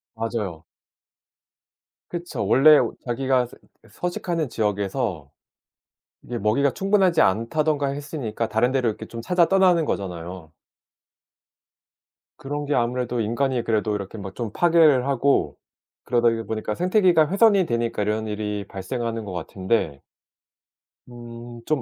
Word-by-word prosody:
맞아요. 110 -8 -4 1.5
그쵸. 175 0 -4
원래 150 +3 +7
오 - - 0
자기가 130 +1 +1
스 - - -16 0.3
예 - - -18
서식하는 175 -4 -3
지역에서 105 - -2 0.9
이게 120 - -5
먹이가 115 +6 +2
충분하지 195 -1 +2
않다든가 145 +8 +1
했으니까 140 -6 -4
다른 110 +3 +1
데로 130 -2 +1
이렇게 105 - -6
좀 115 - -7
찾아 175 +7 +3
떠나는 185 -4 +4
거잖아요. 90 - -5 1.9
그런 145 +2 -4
게 145 - -1
아무래도 125 0 -1
인간이 120 +3 0
그래도 110 -2 0
이렇게 100 +2 -6
뭐 95 -1 -7
좀 115 -1 -5
파괴를 160 -4 +4
하고 140 0 +1 0.5
그러다이 115 -2 +1
보니까 110 0 -3
생태계가 180 -4 +3
훼손이 200 -1 +4
되니까 115 -5 -1
이런 110 +1 -1
일이 105 -1 -3
발생하는 115 +3 -4
것 95 - -6
같은데 90 -3 -2 1.1
음 120 0 -10
좀 155 -4 0
120 Hz, 300 characters per minute, -23 LUFS, 105-145 Hz, 1.9 s, 원래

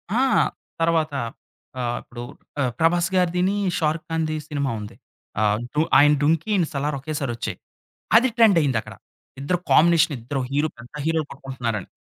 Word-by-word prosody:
ఆ! 245 - +3 0.6
తర్వాత 160 -2 +2 0.7
ఆహ్, 120 0 -1
ఇప్పుడు 120 0 -9 0.4
ఆ! - - +3 0.2
'ప్రభాస్' 170 +2 +3
గారిదిని 180 +2 +2 0.2
'షారుక్ 155 0 -1
ఖాన్‌ది' 155 -1 -1
సినిమా 140 -3 -1
ఉంది. 105 - -9 0.5
ఆహ్, 105 0 +3 0.4
ఆయన 150 +2 +6
'దుంకీ' 165 +6 +1
ఈయన 180 - +3
'సలార్' 140 +1 -1
ఒకేసారొచ్చాయి. 140 -5 -4 0.6
అది 255 +3 +4
ట్రెండ్ 215 -6 +6
అయ్యిందక్కడ. 130 -6 -1 0.5
ఇద్దరు 175 +5 0
కాంబినేషన్ 165 -1 +5
ఇద్దరు 130 +4 -3
హీరో 145 +3 +1
పెద్ద 120 +3 -14
హీరోలు 160 -2 0
కొట్టుకుంటున్నారని. 125 -7 -4
155 Hz, 135 wpm, -23 LUFS, 135-165 Hz, 0.7 s, ఆయన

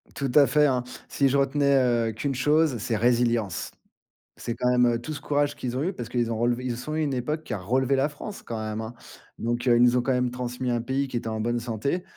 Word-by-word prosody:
Tout 135 -3 -2
à 145 -2 +7
fait, 150 0 +4
hein. 125 -3 +1 0.3
Si 140 - +2
je 140 +2 +2
retenais, 140 0 +2
heu, 120 -3 +2
qu'une 135 +5 -2
chose, 150 0 +2
c'est 110 +1 -2
résilience. 115 -4 +1 0.6
C'est 115 - -5
quand 125 0 0
même, 125 0 +4
heu, 120 0 +1
tout 155 +5 -5
ce - - -7
courage 145 0 0
qu'ils 125 0 -4
ont 140 - -1
eu 185 +3 -1
parce 120 -6 -7
qu'ils 120 -2 0
ont 110 - -2
relevé 120 +2 0
Ils 120 -2 -2
sont 155 +5 -5
une 150 -3 0
époque 150 +6 -2
qui 120 - -5
a - - -1
relevé 130 +7 +1
la 135 +3 +1
France 200 +7 -9
quand 115 -2 -5
même, 110 0 -4
hein. 110 +2 -6 0.5
Donc, 120 +2 -2
heu, 120 - +6
ils - - +4
nous 125 0 +5
ont - - +3
quand 130 - -1
même 125 -1 +1
transmis 125 0 -4
un 120 -1 0
pays 135 +3 -1
qui 120 - -3
était 115 - -4
en 110 0 -3
bonne 120 +2 0
santé 120 - -2
125 Hz, 260 wpm, -26 LUFS, 120-140 Hz, 0.6 s, à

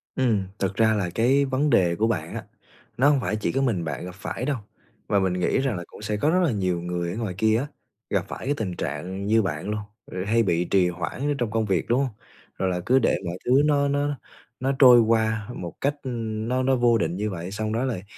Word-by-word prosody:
Ừm, 115 -7 +2 0.2
thực 95 0 -1
ra 110 +1 +4
là 100 -5 -1
cái 135 +5 +3
vấn 135 +3 +1
đề 90 -8 +3
của 110 +5 +1
bạn 85 -8 -2
á, - - -4 0.5
nó 140 +3 +5
hông 145 -2 +3
phải 105 - -1
chỉ 110 - -1
có 135 - 0
mình 115 -10 0
bạn 75 +2 -4
gặp 90 - -8
phải 105 +5 -5
đâu 145 -1 0 0.5
và 100 - +3
mình 95 -2 +1
nghĩ 90 +8 +1
rằng 135 -4 0
là 85 - -5
cũng - - -13
sẽ 105 0 -2
có 145 - +2
rất 180 +3 +3
là 165 - +2
nhiều 90 -5 -1
người 85 0 -3
ở 95 - -5
ngoài 110 -5 -3
kia 110 +1 +3
á, 135 +5 -2 0.4
gặp 100 -3 0
phải - - -7
cái 140 - +1
tình 95 -5 -3
trạng 90 +8 -4
như 110 +1 +4
bạn 95 +1 -3
luôn, 105 - -1 0.3
ừ, 90 0 -5
hay 115 +2 +3
bị 85 -4 +1
trì 90 0 +3
hoãn 90 +6 -5
ở - - +2
trong 120 -4 -2
công 110 0 0
việc, 95 -5 0
đúng 120 +3 +2
hông? 140 - +1 0.5
Rồi 95 - 0
là 90 - -1
cứ 130 +2 +4
để - - +2
mọi 85 +1 -4
thứ - - 0
nó 145 -1 +3
nó 145 +1 0 0.5
nó 130 +2 0
trôi 125 -3 +9
qua 110 -2 +1
một 85 -6 -6
cách, 140 +1 +1
ưm, 115 -3 -3
nó 130 +1 0
nó 135 0 +3
vô 120 -2 +4
định 85 -4 -1
như 105 +3 -2
vậy, 90 -1 -6
xong 110 +1 -3
đó 115 +3 0
lại, 115 -8 -3
110 Hz, 255 wpm, -25 LUFS, 90-125 Hz, 0.5 s, trôi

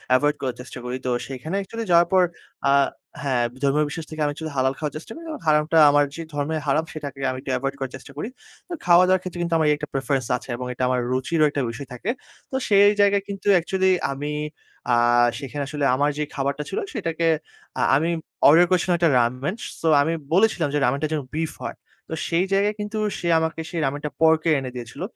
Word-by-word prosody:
Avoid 145 +3 +2
করার 130 -3 -2
চেষ্টা 130 0 -9
করি। 125 +1 -3
তো - - 0 0.2
সেখানে 135 +7 -5
অ্যাকচুয়ালি 225 +4 -4
যাওয়ার 170 0 +6
পর 185 -1 +6 0.5
আ - - +5 0.5
হ্যাঁ, 130 -4 +1 0.2
ধর্মীয় 145 +2 +3
বিশ্বাস 160 +1 -6
থেকে 155 - -8
আমি 145 - +2
অ্যাকচুয়ালি 155 +1 -6
হালাল 130 0 +2
খাওয়ার 150 -2 -3
চেষ্টা 160 - -11
করি। 330 - -10
যেন 315 - -5
হারামটা 155 +1 +3
আমার 145 0 +4
যে 165 - -5
ধর্মের 145 +2 -1
হারাম 150 +3 +2
সেটাকে 140 -3 -7
আমি 130 - -3
একটু 135 - -4
এভয়েড 135 +1 -3
করার 135 -2 -4
চেষ্টা 135 +2 -12
করি। 210 - -3 0.4
তো 355 - -6
খাওয়া-দাওয়ার 180 +1 +5
ক্ষেত্রে 180 -1 -7
কিন্তু 170 -1 -1
আমার 160 -1 +2
এই - - +3
একটা 150 -1 -6
প্রেফারেন্স 135 -2 -1
আছে। 130 - -15 0.2
এটা 125 - -3
আমার 125 -1 +1
রুচিরও 155 +5 +2
একটা 145 - -2
বিষয় 135 +4 -8
থাকে। 170 - -5 0.4
তো - - -3
সেই 200 -1 +6
জায়গায় 200 -1 +3
কিন্তু 195 0 -6
অ্যাকচুয়ালি 190 +2 +2 0.2
আমি 145 +2 -4 0.6
আ - - +4 0.5
সেখানে 140 +1 -4
আসলে 145 0 -2
আমার 145 +2 +2
যে 150 - 0
খাবারটা 140 +1 -1
ছিল, 195 - -2
সেটাকে 165 - -1 0.5
আ - - +1
আমি 160 +5 +1 0.4
অর্ডার 165 +5 +7
করেছিলাম 180 -1 +2
১ - - -16
টা - - +5
রামেন। 125 - 0 0.3
সো 165 - 0
আমি 160 +3 +1 0.2
বলেছিলাম 190 -4 +3
যে 145 - +2
রামেনটা 140 +5 0
যেন 150 - 0
বিফ 160 0 -2
হয়। - - -5 0.3
তো - - -4 0.2
সেই 170 +2 +2
জায়গায় 205 +2 +2
কিন্তু 210 +1 -4 0.2
সে 170 - -3
আমাকে 160 0 -2 0.2
রামেনটা 145 +2 -2
পর্কের 160 0 +4
এনে 130 -1 -5
দিয়েছিল। 120 +4 -8
150 Hz, 210 wpm, -23 LUFS, 140-175 Hz, 0.6 s, অর্ডার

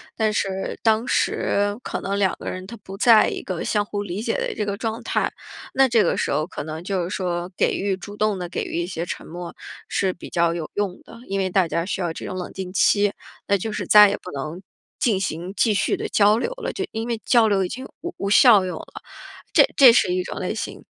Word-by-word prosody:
但 220 -1 +1
是 195 -2 -2
当 225 +1 +3
时 205 0 +1
可 - - -4
能 200 +1 -2
两 190 -3 +2
个 - - -5
人 185 0 -6
他 235 - -9
不 195 -2 -10
在 225 0 +6
一 - - -3
个 185 -3 -4
相 210 -1 +1
互 205 0 -4
理 195 +2 -4
解 225 - -1
的 - - -2
这 210 - -2
个 200 -1 -3
状 225 +2 -4
态。 - - 0 0.4
那 270 0 +5
这 230 -3 +4
个 - - +1
时 - - -1
候 155 - +1
可 - - -6
能 155 +2 -6
就 185 -1 -1
是 175 - -4
说， 180 -1 -3
给 - - +2
予 195 -1 -1
主 205 +2 -9
动 210 -2 0
地 180 - -4
给 - - -3
予 170 - -3
一 175 - -3
些 170 -2 -4
沉 - - -6
默 175 +1 -8 0.3
是 190 -2 0
比 - - -11
较 170 -1 +1
有 165 -3 -5
用 200 -3 -2
的。 230 - -13
因 195 0 -2
为 190 -1 0
大 185 -2 +2
家 170 +1 -1
需 190 -1 -3
要 170 -2 -1
这 - - -7
种 185 - -5
冷 180 - -5
静 185 -1 -6
期， 205 +1 +3 0.3
那 200 - +3
就 215 +4 -4
是 - - -3
再 210 -1 +8
也 205 - -2
不 180 - -9
能 155 +6 -5 0.4
进 230 -9 +2
行 180 0 -3
继 210 +3 +2
续 200 - +1
的 - - -3
交 210 +1 +4
流 470 - -2
了， - - -5
就 385 - -3
因 225 +1 -4
为 235 -2 -2
交 235 -3 +5
流 195 -3 +2
已 - - -5
经 260 +2 -6 0.2
无 350 +1 -5
无 200 - -2
效 215 -3 +7
用 180 - -4
了， - - -10 0.5
这 - - +7
这 265 -3 +9
是 180 - +3
一 185 - 0
种 - - -7
类 - - -2
型。 - - -6
195 Hz, 270 characters per minute, -23 LUFS, 180-215 Hz, 0.5 s, 这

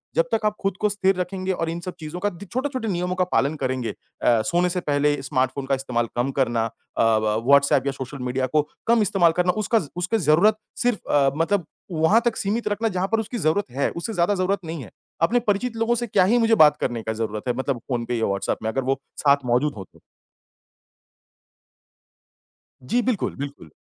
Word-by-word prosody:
जब - - +3
तक 215 - +1
आप 210 0 +1
खुद 195 -2 -1
को 210 - +3
स्थिर 195 -1 +1
रखेंगे 185 +1 -2
और 165 -2 -2
इन 165 +1 -3
सब 180 +1 -6
चीज़ों 155 +3 -6
का 205 - +1
दी 200 +1 -11
छोटे-छोटे 255 +2 -3
नियमों 180 -1 -1
का 185 - +2
पालन 145 +3 +2
करेंगे 130 -2 -1
अ, 115 -2 0
सोने 175 +1 +2
से 180 +1 -1
पहले 145 -1 +1
स्मार्टफ़ोन 130 +1 -1
का 135 0 +1
इस्तेमाल 125 -3 -2
कम 125 +3 +1
करना, 120 -3 +1
अ, 115 - -5 0.3
ब 110 -1 +2
व्हाट्सएप 140 -1 +5
या - - +2
सोशल 135 +1 -7
मीडिया 125 +1 -1
को 150 +4 +2 0.3
कम 235 -1 +4
इस्तेमाल 185 -4 +3
करना 180 0 +3
उसका 225 +2 +2 0.2
उसके 180 +5 0
ज़रूरत 185 +5 +4 0.3
सिर्फ़ 245 -4 -1
अ, 140 -2 +4
मतलब 170 +2 +1 0.3
वहाँ 165 +7 +3
तक 235 -2 +1
सीमित 210 +3 -1
रखना 210 +2 0
जहाँ 185 +2 +1
पर 225 - +2
उसकी 225 +2 -4
ज़रूरत 160 - 0
है, 140 +3 0
उससे 195 +7 -5
ज़्यादा 180 +2 +2
ज़रूरत 190 +1 0
नहीं 160 -3 -5
है, 105 - -13 0.3
अपने 205 +9 +3
परिचित 225 +4 0
लोगों 230 +1 +1
से 240 0 -2
क्या 200 -3 +3
ही 230 +6 +3
मुझे 225 -1 +4
बात 150 -5 +6
करने 120 -1 -1
का 110 - -2
ज़रूरत 110 -1 -3
है 125 - +2
मतलब 130 -1 -1
फ़ोन 120 -2 -1
पे 120 - -2
या 115 - +1
व्हाट्सएप 100 0 -1
में, 110 - 0
अगर 135 +3 -1
वो 135 +2 0 0.3
साथ 140 -1 +4
मौजूद 125 +5 +1
हों - - -6
तो? - - -21 2.8
जी। 245 +2 +1
बिल्कुल, 240 -5 -1
बिल्कुल। 140 - -7
165 Hz, 210 wpm, -23 LUFS, 130-205 Hz, 2.8 s, बात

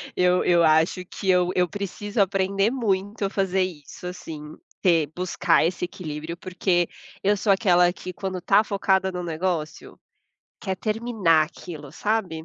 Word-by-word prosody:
Eu 180 0 +3
eu 175 -1 +4
acho 160 +3 +3
que 190 +2 -5
eu 180 -1 +4
eu 180 -1 +3
preciso 205 +2 -3
aprender 195 +2 +1
muito 205 -4 -1
a - - -1
fazer 190 -1 +1
isso, 175 -1 -7
assim, 155 -4 -8 0.3
ter 165 -5 +3
buscar 180 -2 +2
esse 170 +1 -2
equilíbrio, 170 -3 -6
porque 180 -2 0 0.4
eu 205 +2 +3
sou 200 +1 +2
aquela 180 -3 +4
que 185 0 -8
quando 190 0 -4
tá 200 +4 +4
focada 190 -2 +1
no 180 -1 -4
negócio, 165 -1 -3 0.6
quer 190 -2 -3
terminar 215 -6 +2
aquilo, 155 -3 -10
sabe? 195 -7 -2
185 Hz, 150 wpm, -24 LUFS, 170-195 Hz, 0.6 s, eu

